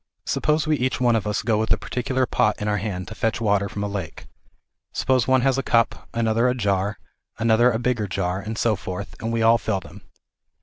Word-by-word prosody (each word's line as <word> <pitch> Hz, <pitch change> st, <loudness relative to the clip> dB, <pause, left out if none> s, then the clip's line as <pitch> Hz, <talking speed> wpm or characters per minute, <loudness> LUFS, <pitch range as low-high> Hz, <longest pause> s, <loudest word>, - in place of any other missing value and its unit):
Suppose 150 Hz, 0 st, +1 dB
we 155 Hz, -1 st, +1 dB
each 130 Hz, 0 st, -1 dB
one 120 Hz, -2 st, +3 dB
of 105 Hz, -2 st, -1 dB
us 105 Hz, -, -1 dB
go 110 Hz, -1 st, +1 dB
with 110 Hz, -, -1 dB
a -, -, +4 dB
particular 130 Hz, +1 st, -1 dB
pot 105 Hz, -3 st, +1 dB
in 105 Hz, -, -3 dB
our 105 Hz, 0 st, +1 dB
hand 90 Hz, -3 st, -4 dB
to -, -, -7 dB
fetch 110 Hz, +2 st, -1 dB
water 100 Hz, -3 st, +1 dB
from 100 Hz, -, -4 dB
a -, -, -1 dB
lake. 95 Hz, -6 st, -6 dB, 0.7 s
Suppose 130 Hz, -2 st, +1 dB
one 130 Hz, -1 st, +4 dB
has 135 Hz, +1 st, +2 dB
a -, -, +1 dB
cup, 115 Hz, -3 st, +1 dB
another 115 Hz, +1 st, +1 dB
a 125 Hz, -, 0 dB
jar, 100 Hz, -3 st, 0 dB, 0.4 s
another 115 Hz, +2 st, +4 dB
a 110 Hz, -, 0 dB
bigger 120 Hz, -3 st, -1 dB
jar, 90 Hz, 0 st, -2 dB
and 110 Hz, +2 st, -5 dB
so 110 Hz, -2 st, +2 dB
forth, 95 Hz, +2 st, -6 dB
and 115 Hz, -, -2 dB
we 115 Hz, -1 st, 0 dB
all 115 Hz, +1 st, +5 dB
fill 100 Hz, -1 st, -1 dB
them. -, -, -13 dB
110 Hz, 225 wpm, -23 LUFS, 100-120 Hz, 0.7 s, all